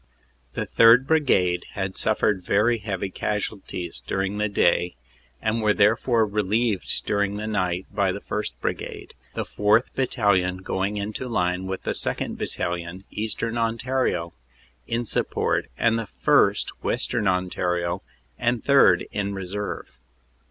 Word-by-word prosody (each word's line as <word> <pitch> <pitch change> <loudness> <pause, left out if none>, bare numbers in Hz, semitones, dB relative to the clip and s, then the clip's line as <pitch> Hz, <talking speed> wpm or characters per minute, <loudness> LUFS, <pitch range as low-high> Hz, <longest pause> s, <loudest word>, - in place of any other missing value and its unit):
"The - - -2
3rd. 115 +3 +6
Brigade 100 - +2
had 95 -1 -3
suffered 105 -3 +1
very 115 +5 +2
heavy 100 -2 -3
casualties 100 -4 -4
dur 95 - -2
ing 100 +2 -3
the 105 0 +1
day, 90 -4 +2 0.5
and 110 +1 0
were 105 -1 +3
therefore 115 +2 +3
relieved 105 0 0
during 100 0 0
the 105 - -4
night 95 -4 -1
by 100 -2 +2
the 100 - -4
1st. 105 -7 -3
Brigade, - - -4 0.2
the - - -1
4th. 105 +4 +2
Battalion 100 -8 +1
going 95 +3 -1
into 105 +5 -4
line 90 -4 0
with 95 0 -4
the - - -1
2nd. - - -1
Battalion, 85 +2 -4
Eastern 115 +2 -2
Ontario, 115 -6 0 0.5
in 120 +1 -1
support - - 0
and 115 0 +2
the 115 - -5 0.2
1st., - - +4
Western 110 -4 0
Ontario, 90 -1 0 0.4
and 120 -1 0
3rd. 115 -11 +5
in 100 -1 -2
reserve. 95 +2 -4
105 Hz, 135 wpm, -24 LUFS, 95-115 Hz, 0.5 s, 3rd